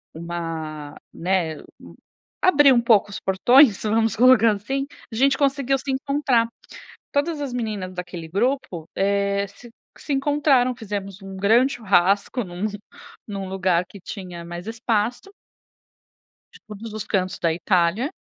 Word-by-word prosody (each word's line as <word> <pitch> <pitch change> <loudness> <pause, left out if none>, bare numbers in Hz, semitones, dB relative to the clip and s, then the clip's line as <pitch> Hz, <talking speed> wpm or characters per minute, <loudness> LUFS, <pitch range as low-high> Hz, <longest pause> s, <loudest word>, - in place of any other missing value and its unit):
uma, 160 -3 -5 0.2
né, 170 -3 -1 0.8
abriu 290 -7 +6
um 235 - +4
pouco 220 -3 +4
os 205 - -6
portões 235 +4 +5
vamos 220 0 +1
colocar 245 -1 +6
assim, 270 +7 -3 0.3
a - - -4
gente 270 +2 +3
conseguiu 275 -1 +1
se 270 0 -4
encontrar. 265 -3 +1 0.7
Todas 290 +2 0
as 275 -3 -4
meninas 210 -6 -4
daquele 175 -2 -7
grupo, 200 - -1
eh, 200 0 +1
se 235 +4 -15 0.3
se 295 - -5
encontraram, 270 -3 +2
fizemos 200 -3 -6
um 195 0 -8
grande 230 +8 +3
churrasco 200 +2 +2
em 185 - -9
um 180 +4 -3 0.6
em 205 - -5
um 195 -1 -5
lugar 185 -2 +1
que 200 - -12
tinha 180 -3 -8
mais 175 +2 -8
espaço. 225 - -2 1.2
De - - -15
todos 215 +1 -8
os 215 - -4
cantos 185 -2 -1
da 165 - +1
Itália. 180 - +1
210 Hz, 140 wpm, -23 LUFS, 185-255 Hz, 1.2 s, abriu